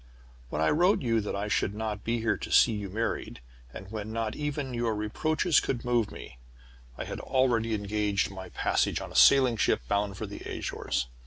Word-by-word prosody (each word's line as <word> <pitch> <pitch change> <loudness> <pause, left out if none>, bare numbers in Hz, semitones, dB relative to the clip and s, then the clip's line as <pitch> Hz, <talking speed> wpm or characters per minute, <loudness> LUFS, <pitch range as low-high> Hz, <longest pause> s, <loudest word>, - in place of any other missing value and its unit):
When 75 +4 -1
I 80 - +3
wrote 175 +2 +3
you 115 -2 +2
that 105 - -4
I 100 +1 -2
should 100 0 0
not 105 -2 -4
be 115 0 -1
here 115 - +1
to - - -7
see 120 - +6
you 105 -2 -4
married, 110 - -3 0.3
and 95 +8 -10
when 110 -1 -5
not 110 -1 -2
even 145 -3 -3
your 120 -2 0
reproaches 155 +10 +1
could 125 -2 -3
move 120 -3 +1
me, 65 - -11 0.6
I - - -3
had - - -6
already 120 -4 +1
engaged 105 -1 -1
my 95 -1 -8
passage - - 0
on - - -7
a - - -12
sailing 130 -4 +6
ship - - +2
bound 100 +2 0
for 110 - -4
the 100 0 -8
Azores. - - -3
110 Hz, 195 wpm, -28 LUFS, 100-120 Hz, 0.6 s, see